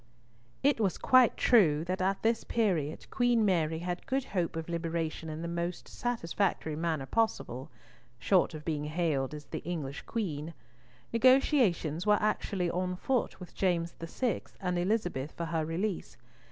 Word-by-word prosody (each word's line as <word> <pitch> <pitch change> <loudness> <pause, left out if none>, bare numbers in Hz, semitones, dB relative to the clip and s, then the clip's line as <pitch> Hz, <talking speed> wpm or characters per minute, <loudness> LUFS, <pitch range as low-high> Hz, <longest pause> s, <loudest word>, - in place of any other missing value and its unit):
It 280 -3 +3
was 195 -4 +1
quite 255 -2 +5
true 160 -11 +4
that 185 +1 -2
at 190 +1 0
this 225 0 +2
period 175 -10 0
Queen 245 -3 +3
Mary 165 -5 +2
had 175 +1 -4
good 270 0 0
hope 175 -4 0
of 165 -1 -4
liberation 165 -1 -3
in 155 +1 -5
the - - -3
most 170 +1 -3
satisfactory 195 -8 -1
manner 160 -3 -1
possible—short 130 - -1
of 150 - -8
being 150 -3 -1
hailed 150 -3 -1
as 150 -1 -9 0.2
English 150 -5 -4
Queen. 165 -8 -3 0.6
Negotiations 230 - +3
were 210 0 +6
actually 195 -4 0
on 180 +1 -1
foot 250 +4 -1
with 180 - -10
James 170 -3 0
VI. 215 +9 -1 0.2
and 180 -2 -1
Elizabeth 175 -7 -1
for 170 - -4
her 165 -1 -1
release. 175 +5 -3
175 Hz, 145 wpm, -31 LUFS, 160-210 Hz, 0.6 s, were